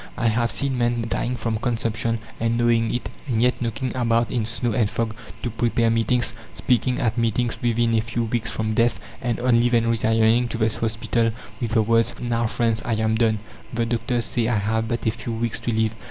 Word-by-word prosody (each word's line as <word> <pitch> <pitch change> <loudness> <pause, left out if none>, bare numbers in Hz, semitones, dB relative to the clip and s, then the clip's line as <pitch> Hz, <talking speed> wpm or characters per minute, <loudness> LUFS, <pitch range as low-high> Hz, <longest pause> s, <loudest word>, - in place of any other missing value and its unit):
I 120 -2 +2
have 115 +1 +1
seen 130 +3 0
men, 120 -1 +1
dying 125 +2 -1
from 115 -2 -2
consumption, 115 -1 -1 0.2
and 115 +1 +1
knowing 115 -1 +2
it, 120 - -3 0.2
and 120 -4 0
yet 125 +2 +2
knocking 120 +2 -2
about 115 -2 +1
in 115 -3 -1
snow 115 +1 -1
and 105 -2 +2
fog 110 -1 -2 0.3
to 120 - -1
prepare 115 0 +1
meetings, 115 +1 +1 0.2
speaking 125 0 +1
at 115 -2 0
meetings 115 +1 0
within 115 -1 +2
a 110 - +3
few 115 +1 -2
weeks 115 0 -1
from 110 0 -1
death, 115 +2 +2 0.2
and 120 -2 -1
only 120 -1 +3
then 115 -1 +2
retiring 115 +1 +3
to 115 - -4
the 110 -1 +2
hospital 115 +1 0 0.3
with 115 -2 -2
the 110 -2 +4
words: 115 +1 +2
"Now, 115 -1 0
friends, 115 0 0
I 115 0 -1
am 110 0 +1
done; 110 -1 +2 0.3
the 115 -1 0
doctors 115 +1 -1
say 115 -2 0
I 120 -2 +1
have 110 +2 0
but 120 +1 -3
a 110 - +3
few 115 +1 -5
weeks 115 0 -2
to 120 - -2
live. 110 -1 +1
115 Hz, 210 wpm, -23 LUFS, 110-120 Hz, 0.3 s, the